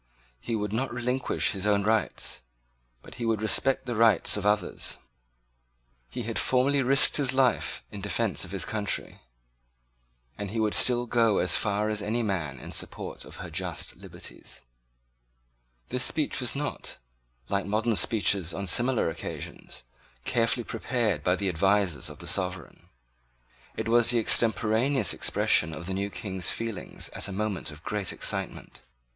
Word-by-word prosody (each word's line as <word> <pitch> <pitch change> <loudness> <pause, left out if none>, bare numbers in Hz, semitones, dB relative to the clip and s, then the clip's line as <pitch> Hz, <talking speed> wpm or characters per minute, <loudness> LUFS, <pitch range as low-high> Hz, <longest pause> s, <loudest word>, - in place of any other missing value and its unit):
He 115 - -3
would 105 -1 -2
not 130 +4 -1
relinquish 125 +2 0
his 100 -2 -3
own 100 -1 +3
rights; 110 +1 0 0.6
but - - -12
he - - -1
would 110 -2 +1
respect 130 +5 +2
the 120 -2 -3
rights 110 -4 +5
of 105 -1 -1
others. 105 0 0 1.1
He 120 - -5
had 115 0 -2
formerly 135 +2 +3
risked 135 +2 +5
his 135 -3 +2
life 130 -3 +1
in - - -7
defense - - -1
of - - -8
his - - -1
country; - - -2 1.2
and 100 -1 -4
he 110 +3 -3
would 110 -1 +1
still 120 -1 +4
go 115 -3 +2
as 90 -2 +3
far 105 0 +1
as 105 -1 -2
any 110 +4 -1
man 80 - -2
in - - -9
support - - 0
of - - -11
her - - -8
just - - -2
liberties. - - -11 1.3
This 125 +1 +1
speech 150 -2 0
was 125 - -4
not, 145 +1 -4 0.5
like 100 0 -1
modern 110 +2 +1
speeches 95 -2 +2
on 100 - -3
similar 120 +6 +3
occasions, 80 -5 -6 0.4
carefully 120 0 +2
prepared 120 -2 -1
by 90 - +3
the 100 0 -2
advisers 95 -2 +1
of 75 - -10
the 85 - -10
sovereign. 90 -1 -3 0.9
It - - -2
was 120 0 +4
the 120 - +4
extemporaneous 115 - +3
expression 80 -2 +2
of 85 - -7
the 95 - -3
new 100 +1 -2
King's 95 -3 -3
feelings 115 -3 -4
at - - -5
a - - -6
moment 100 -2 -2
of 75 0 -12
great 105 -3 -2
excitement. - - -3
110 Hz, 155 wpm, -27 LUFS, 100-120 Hz, 1.3 s, rights